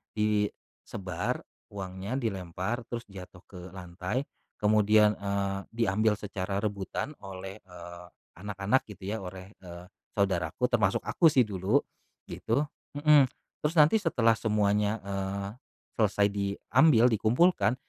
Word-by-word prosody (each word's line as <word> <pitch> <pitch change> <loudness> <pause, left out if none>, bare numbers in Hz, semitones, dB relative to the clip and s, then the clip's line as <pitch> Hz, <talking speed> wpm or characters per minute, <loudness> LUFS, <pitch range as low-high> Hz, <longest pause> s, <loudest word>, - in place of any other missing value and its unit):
disebar 105 -4 -2 0.2
uangnya 95 +3 -5
dilempar 110 0 -3
terus 120 -1 -5
jatuh 90 -1 -11
ke 90 - -12 0.2
lantai 90 +7 -3 0.3
kemudian, 105 0 +4
eee, 100 -1 -1 0.2
diambil 110 -1 +2
secara 100 0 -4
rebutan 100 +6 -3
oleh, 95 +1 -8
eee, 85 -1 -11 0.3
anak-anak 105 +5 0
gitu 105 -2 -12
ya 110 - -2
oleh, 95 +1 -9
eee, 90 -1 -10 0.3
saudaraku 95 +2 0
termasuk 110 -1 +2
aku 170 - +3
sih 135 -5 +5
dulu 95 -2 +1 0.4
gitu, 125 +7 -1 0.3
mhm, 145 -2 +6 0.3
terus 150 +3 -1
nanti 155 +9 +6
setelah 125 - +2
semuanya, 105 0 +1
eee, 100 0 -3 0.5
selesai 105 -1 +3
diambil 115 +6 +3
dikumpulkan 125 - +3
100 Hz, 115 wpm, -29 LUFS, 95-115 Hz, 0.5 s, mhm